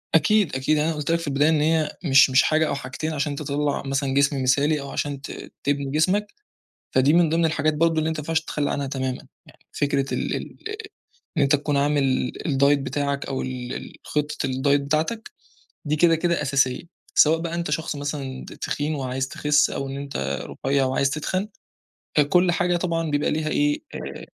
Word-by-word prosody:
أكيد، 185 0 +3
أكيد 140 +4 +1
أنا 160 +2 +1
قُلت 150 +1 -2
لك 170 - +2
في 165 - -6
البداية 145 +3 +3
إن 155 -2 +2
هي 155 0 +1
مش 135 -1 +6
مش 130 +1 +5
حاجة 155 0 +2
أو - - -1
حاجتين 140 +4 -4
عشان 145 0 -1
تطَلّع 145 0 -1
مثلًا 135 0 -1
جسم 140 -1 +2
مثالي 145 +3 +2
أو 140 - -7
عشان 140 -2 -3
ت - - -7 0.3
تبني 140 -1 -1
جسمك، 185 +7 +1 0.6
فدي 130 +3 +3
من 170 -1 +5
ضمن 165 +1 +1
الحاجات 155 -1 +1
برضه 165 +1 +2
اللي 155 +1 +1
أنت 160 - -2
ما - - -7
ينفعش 160 +2 0
تتخلّى 150 -2 -2
عنها 140 -1 -2
تمامًا. 130 -1 -3 0.2
يعني - - -21
فكرة 140 -1 0
ال - - -1
ال - - -7 0.8
إن - - +4
أنت 140 +2 +4
تكون 145 0 -1
عامل 145 0 +2
ال 135 +2 -1
الdiet 140 +1 +4
بتاعك 140 +1 -2
أو 135 -1 -3
ال 125 -1 -5
ال - - -7
خطة 150 0 -2
الdiet 140 +2 +2
بتاعتك 155 +11 -2 0.5
دي 150 +1 0
كده، 165 +1 +5
كده 170 -1 0
أساسية، 135 -2 +1 0.3
سواء 160 +2 +5
بقى 170 0 -4
أنت 170 -2 -2
شخص 155 -1 -2
مثلًا 140 -2 -5
ت - - -10
تخين 150 +2 -3
وعايز 130 -1 -2
تخِسّ، 145 +2 +2
أو 135 - -3
إن 135 - -5
أنت 70 - -3 0.3
رُفيَّع 135 0 +3
وعايز 135 +1 +1
تِتخَن، 185 +7 -2 0.7
فكُلّ 175 +5 +4
حاجة 175 0 +1
طبعًا 165 -3 -1
بيبقى 145 0 +1
ليها 155 0 -1
إيه، 295 - +1
آآ، - - -6
145 Hz, 195 wpm, -24 LUFS, 140-160 Hz, 0.8 s, مش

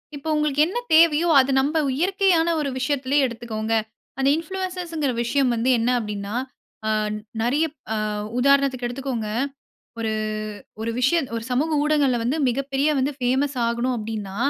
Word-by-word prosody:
இப்போ, 290 +3 -5
உங்களுக்கு 300 -1 +1
என்ன 475 +7 -2 0.2
தேவையோ 330 0 +5
அத 265 +1 +3
நம்ப 290 +4 +1 0.2
இயற்கையான 365 -1 +2
ஒரு 290 -2 -1
விஷயத்துலேயே 275 +1 +1
எடுத்துக்கோங்க. 225 -2 -4 0.4
அந்த 270 - +1
இன்ஃப்ளூயன்ஸ்ங்கிற 350 -4 -3
விஷயம் 260 +1 +1
வந்து 230 +3 0
என்ன 230 - +1
அப்டீன்னா, 210 -1 -5 0.5
ஆ - - +1 0.5
நெறைய 275 +8 +2 0.3
அ - - -1 0.4
உதாரணத்துக்கு 275 -2 +3
எடுத்துக்கோங்க. 245 -4 -4 0.7
ஒரு, 220 -1 -1 0.7
ஒரு 230 - -2
விஷய 270 +7 +3 0.2
ஒரு 225 - -4
சமூக 290 +6 +1
ஊடகங்கள்ல 290 -5 +2
வந்து 270 +7 0
மிக 245 +3 0
பெரிய 275 +2 +2 0.3
ஃபேமஸ் 265 +2 +1
ஆகணும் 235 +2 0
அப்டீன்னா, 210 -3 -5
270 Hz, 135 wpm, -23 LUFS, 235-305 Hz, 0.7 s, தேவையோ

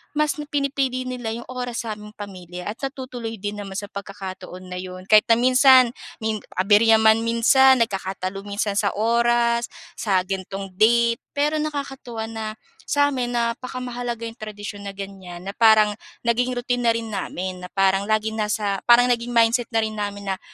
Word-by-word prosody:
mas 300 -1 +1 0.2
pinipili 275 -3 0
nila 250 -2 -5
'yong 235 +1 -6
oras 245 -2 -4
sa - - -2
aming 210 0 -11
pamilya 180 -3 -8
at 225 - -11
natutuloy 255 -4 -5
din 205 +1 -4
naman 195 -1 -7
sa 205 - -7
pagkakataon 190 -2 -8
na 180 0 -5
'yon. 185 +1 -8
Kahit 215 0 +7
na - - +8
minsan 255 0 +6 0.3
min 220 -1 -1 0.2
abirya 215 +3 +5
man 220 0 +5
minsan, 255 +3 +5
nagkakatalo 195 -1 -4
minsan 205 0 -2
sa 200 - +1
oras, 235 +1 +2 0.3
sa 190 -4 +1
ganitong 195 0 -5
date, 235 +1 +4 0.2
pero 300 +2 +1
nakakatuwa 270 -6 -4
na 220 -1 -5 0.4
sa 285 0 +3
amin 245 -2 -2
napaka 240 +2 -2
mahalaga 240 -2 -4
'yong 230 +1 -7
tradisyon 205 -1 -7
na 195 - -7
ganyan 190 -3 -8
na 195 - -4
parang 220 -2 +6 0.3
naging 245 +2 +1
routine 245 0 -1
na - - +6
rin 225 -1 -4
namin 185 -2 -4
na 180 - -7
parang 195 +1 +2
laging 220 0 0
nasa 210 -2 -1
parang 245 +1 +6
naging 240 0 -1
mindset 230 +1 +3
na 225 -1 +2
rin 215 -1 -4
namin 200 -1 -4
na 190 - -3
225 Hz, 170 wpm, -23 LUFS, 200-245 Hz, 0.4 s, na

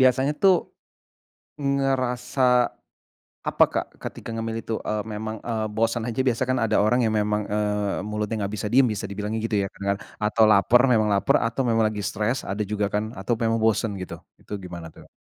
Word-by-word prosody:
biasanya 130 +2 +4
tuh, 195 -1 +7 1.1
ngerasa, 135 -2 0 1.1
apa - - +5
Kak - - 0 0.2
ketika - - -7
ngemil 115 0 -3
itu, 115 - -3
eee, 105 0 -2
memang, 110 +1 -4
eee, 110 -2 -2
bosen 115 +1 +1
aja 115 - -4
biasa 125 0 +2
kan 130 - +2
ada 110 -2 +2
orang 110 +4 +3
yang 110 - +1
memang, 105 0 +1
eee, 105 -2 -1
mulutnya 105 +1 -2
enggak 100 +1 -3
bisa 105 - -2
diem 130 0 +6
bisa 100 - -4
dibilangnya 105 +2 -4
gitu 110 - -1
ya? 100 - -1
Kenger 100 0 -1 0.2
atau 110 +1 +2
lapar 105 +4 +5
memang 110 -3 +4
lapar 100 - +3
atau 115 +3 -1
memang 115 -3 +2
lagi 105 -1 -1
stres 110 +5 -1
ada 100 +2 -3
juga 105 0 -1
kan? 110 +2 -2
Atau 105 +5 -2
memang 115 0 0
bosen 110 -1 +2
gitu 95 - -6 0.2
itu - - -9
gimana 85 -3 -8
tuh? - - -16
110 Hz, 185 wpm, -24 LUFS, 105-120 Hz, 1.1 s, tuh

